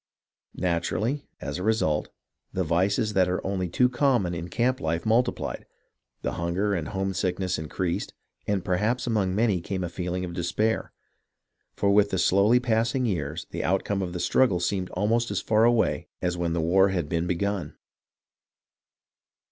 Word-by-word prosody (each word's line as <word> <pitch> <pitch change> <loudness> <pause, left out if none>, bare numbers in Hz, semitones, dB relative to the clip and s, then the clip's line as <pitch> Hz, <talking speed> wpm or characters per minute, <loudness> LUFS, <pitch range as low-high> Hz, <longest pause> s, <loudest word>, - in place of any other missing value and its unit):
Natu 85 -2 0
rally, 130 +7 -1
as 70 +5 -4
a - - -4
result, 105 -8 +1 0.4
the 95 - -1
vices 95 +6 +1
that 95 -2 +3
are 90 - 0
only 95 -2 -1
too 125 +8 +3
common 125 -8 +1
in 85 +1 -5
camp 125 +8 +1
life 80 +3 -2
multiplied, 120 +3 0 0.6
the - - -1
hunger 90 +5 -1
and 85 -5 -2
homesickness 95 -2 -1
in 80 -1 -6
creased, 90 -2 -2 0.3
and 100 -3 0
perhaps 105 +7 0
among 100 -6 0
many 105 -5 +2
came 95 +2 -3
a 90 - -3
feeling 90 +1 -3
of 85 - -7
despair; 105 +6 -1 0.8
for 100 - +2
with 100 0 +4
the 95 - -1
slowly 100 +7 +4
passing 115 +1 +1
years 80 -5 -2
the - - -3
outcome 95 +1 0
of 90 -2 -3
the - - -3
strug 130 +8 +3
gle 90 -6 -1
seemed 90 +1 -1
almost 115 +5 +1
as 100 -1 -1
far 110 +2 +3
away 120 -1 +2
as 90 -1 -1
when 85 -1 -1
the 85 - 0
war 95 +4 +4
had 90 -5 -1
been 85 +3 -1
begun. 100 +2 -2
95 Hz, 170 wpm, -26 LUFS, 85-110 Hz, 0.8 s, with